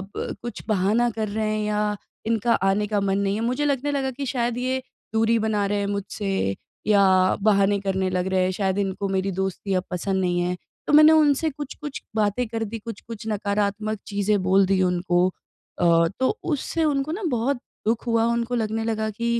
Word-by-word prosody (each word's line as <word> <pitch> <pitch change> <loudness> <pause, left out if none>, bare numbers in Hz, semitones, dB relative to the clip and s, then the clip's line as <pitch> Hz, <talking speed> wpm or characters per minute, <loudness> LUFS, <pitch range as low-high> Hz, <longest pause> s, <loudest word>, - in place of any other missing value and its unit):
ब - - -4
कुछ 240 0 -6
बहाना 215 +4 +2
कर 220 -1 -3
रहे 215 +1 -1
हैं 215 0 -1
या 210 0 0 0.3
इनका 230 +1 +2
आने 195 +2 +1
का 205 -1 0
मन 195 0 +1
नहीं 200 0 0
है, 220 - -2
मुझे 250 +5 0
लगने 285 0 0
लगा 270 -2 -1
कि 275 +2 -5
शायद 240 -2 -1
ये 260 +1 -1 0.3
दूरी 225 +1 +3
बना 210 -2 0
रहे 205 +1 0
हैं 200 - -1
मुझसे, 195 - -2 0.3
या 190 -3 +4
बहाने 200 -1 +3
करने 190 -1 0
लग 180 0 -1
रहे 185 -1 +3
हैं 185 - +1
शायद 190 -1 +1
इनको 195 0 -2
मेरी 190 0 0
दोस्ती 190 +1 -2
अब 185 -1 +1
पसंद 190 +2 -1
नहीं 175 -1 +1
है। 180 +1 -1 0.3
तो - - 0
मैंने 305 +1 +9
उनसे 310 0 +4
कुछ-कुछ 290 0 -7
बातें 215 +3 +1
कर 225 0 -3
दी 225 - -3
कुछ-कुछ 225 0 -8
नकारात्मक 210 0 -1
चीज़ें 205 0 +1
बोल 190 +1 +4
दी 190 0 +2
उनको 175 0 +2 0.5
अ, 170 -1 +4
तो 260 +11 +1
उससे 325 0 -1
उनको 290 -1 0
ना 395 +6 -4
बहुत 250 +3 0 0.3
दुःख 225 +2 0
हुआ 230 -1 +3
उनको 235 +1 0
लगने 225 -1 -1
लगा 220 -1 -1
कि 215 +3 -5
210 Hz, 195 wpm, -24 LUFS, 195-235 Hz, 0.5 s, मैंने